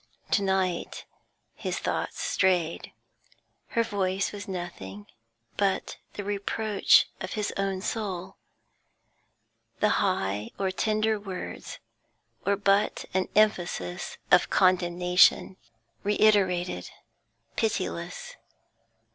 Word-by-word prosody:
To 200 - +4
night 190 -3 -1 0.5
his - - -4
thoughts - - -2
strayed; 175 -3 +1 0.8
her 230 - +1
voice 195 -3 -1
was 205 +1 -8
nothing 170 - -6 0.5
but 195 -2 0 0.2
the 205 - -5
reproach 205 +1 +3
of 185 - -5
his 210 -2 -2
own 195 -1 -1
soul; 190 -4 -4 1.4
the - - +3
high 100 +2 0
or 190 -1 0
tender 215 +3 +1
words 190 -3 -7 0.7
were 200 0 +2
but 200 +1 +2
an 190 0 +1
emphasis 175 - +1
of - - +6
condemnation, 180 0 +4 0.5
reiterated, 200 -4 +2 0.7
pitiless. 215 - -3
190 Hz, 90 wpm, -27 LUFS, 180-205 Hz, 1.4 s, of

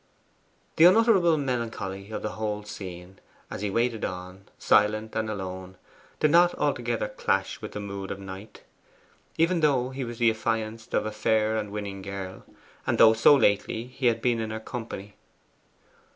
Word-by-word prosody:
The 160 - +7
unutterable 185 -4 +5
melancholy 115 -7 -3
of 110 - -5
the - - -2
whole 105 -1 -3
scene, 95 -3 -9 0.3
as - - -5
he 105 - -1
waited 115 +2 0
on, 90 +1 -6
silent 110 +1 +2
and 110 -1 -1
alone, 95 -2 -6 0.4
did 155 - +3
not 175 +2 +5
altogether 120 -6 -1
clash 105 - -1
with - - -7
the - - -4
mood 100 -1 -6
of - - -4
Knight, 95 +2 -10 0.7
even 165 +2 +2
though 135 -5 +2
he 135 0 -4
was 120 -1 -6
the 115 -1 +4
affianced 110 0 -3
of - - +1
a 110 - -2
fair 110 0 +1
and 105 -2 -2
winning 100 -2 -5
girl, 95 -1 -7 0.4
and - - +1
though 110 -1 +8
so 115 +6 +6
lately 110 -1 +1
he 130 0 -2
had 115 -1 +1
been 120 -2 +2
in 110 -1 -3
her 110 0 -4
company. 110 -4 -7
110 Hz, 165 wpm, -26 LUFS, 100-120 Hz, 0.7 s, though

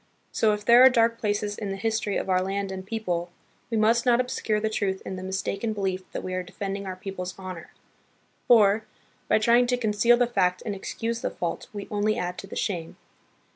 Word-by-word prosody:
So 220 - +2
if 210 0 -5
there 240 +2 +8
are 260 - +10
dark 230 -2 +2
places 205 -1 -1
in 205 - -4
the 195 - -2
history 220 0 -1
of - - -3
our 185 -1 +2
land 195 +1 -2
and 190 0 -5
people, 185 -5 -3 0.4
we 225 - -1
must 225 +2 +3
not 245 -1 +4
obscure 235 -4 0
the 220 - 0
truth 200 -3 -1
in 190 - -4
the 185 - -6
mistaken 195 +3 -2
belief 190 -2 -3
that - - -5
we 185 - -4
are 185 - -1
defending 195 +2 -5
our 185 - -4
people's 185 -1 -6
honor, 185 -3 -8 0.8
for, 215 -2 +5 0.4
by - - +4
trying 235 +3 +4
to 250 0 +1
conceal 230 +1 +3
the 245 - +3
fact 185 -6 0
and 210 - -2
ex 195 - -6
cuse 230 +1 -2
the - - -1
fault, 170 -1 -4
we 205 -1 -7
only 215 +1 +1
add 180 -2 -3
to 195 - -8
the - - -9
shame. 170 -5 -3
205 Hz, 215 wpm, -26 LUFS, 190-225 Hz, 0.8 s, are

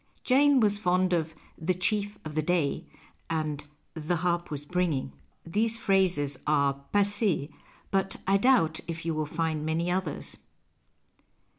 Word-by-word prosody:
Jane 275 +1 +5
was 205 -3 +3
fond 185 -1 +2
of 160 -2 -1
" - - -28
the 175 +3 0
chief 205 +2 -1
of 155 - -6
the 155 - +1
day 160 -3 0 0.2
" - - -31
and 155 -2 -2 0.2
" - - -44
the 160 +2 -2
harp 175 0 -1
was 145 -1 -5
bringing." 160 - -1 0.3
These 220 +7 0
phrases 185 -9 +1
are 140 -2 +2
passees, 205 -6 +1 0.4
but 195 0 +1
I 195 +1 +4
doubt 200 -9 +3
if 165 -1 -5
you 165 - 0
will 155 -1 -2
find 160 -1 -2
many 165 +3 0
others. 185 -4 -3
170 Hz, 155 wpm, -28 LUFS, 155-195 Hz, 0.4 s, Jane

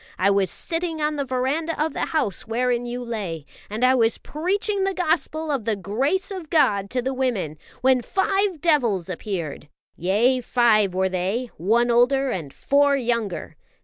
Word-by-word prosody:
I 195 +2 +3
was 195 -2 +2
sitting 330 -1 -3
on 300 0 0
the 280 -1 -2
verandah 270 +6 -1
of 310 +1 0
the - - -2
house 295 - -1
wherein 245 +1 0
you 245 +1 -4
lay, 195 -10 -4 0.2
and 215 +4 -3
I 255 - +5
was 230 -3 +2
preaching 390 +5 -1
the 390 0 0
Gospel 320 -2 0
of 265 -7 -2
the 225 - +1
grace 265 - -1
of 365 -5 -6
God 200 -11 +2
to 250 -1 -1
the 265 +1 -1
women, 220 - -2 0.2
when 255 -1 +4
five 385 - 0
devils 235 - +2
appeared. 170 -6 -5 0.3
Yea, 225 +9 +2
five 215 -6 +3
were 190 0 +1
they, 195 +7 -2
one 235 +8 +2
older 260 +3 +3
and 160 - -4
four 280 - +2
younger. 230 - -2
245 Hz, 170 wpm, -23 LUFS, 200-300 Hz, 0.3 s, I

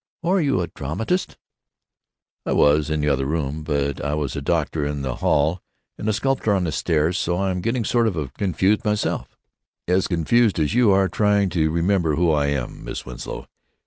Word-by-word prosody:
"Oh? 170 - +1
Are 190 -1 +3
you 140 - +1
a - - 0
dramatist?" 85 - -3 1.1
"I - - -1
was—in 75 +1 +3
the 75 - 0
other 70 -1 0
room. 75 -1 -2
But 70 -2 -1
I 75 0 -1
was 70 -3 -3
a 70 - -3
doctor 80 0 -1
out 70 - -1
in 70 -1 -5
the 65 -2 -3
hall 80 +5 +1 0.3
and 110 - -3
a - - +2
sculptor 115 -2 +1
on 95 - 0
the 85 - -1
stairs, 80 +2 0
so 85 +1 0
I'm 95 -2 -1
getting 115 +2 -1
sort 115 +1 +2
of 75 - -3
confused 95 +3 +1
myself—as 95 - -3
confused 100 +6 +2
as 75 +3 0
you 120 -2 +4
are, 95 0 +4
trying 105 -1 +2
to 80 -3 +1
remember 85 -1 +1
who 85 0 +2
I 75 -2 +2
am, 70 -4 -3
Miss - - -6
Winslow. 60 -2 -7
85 Hz, 190 wpm, -22 LUFS, 75-100 Hz, 1.1 s, you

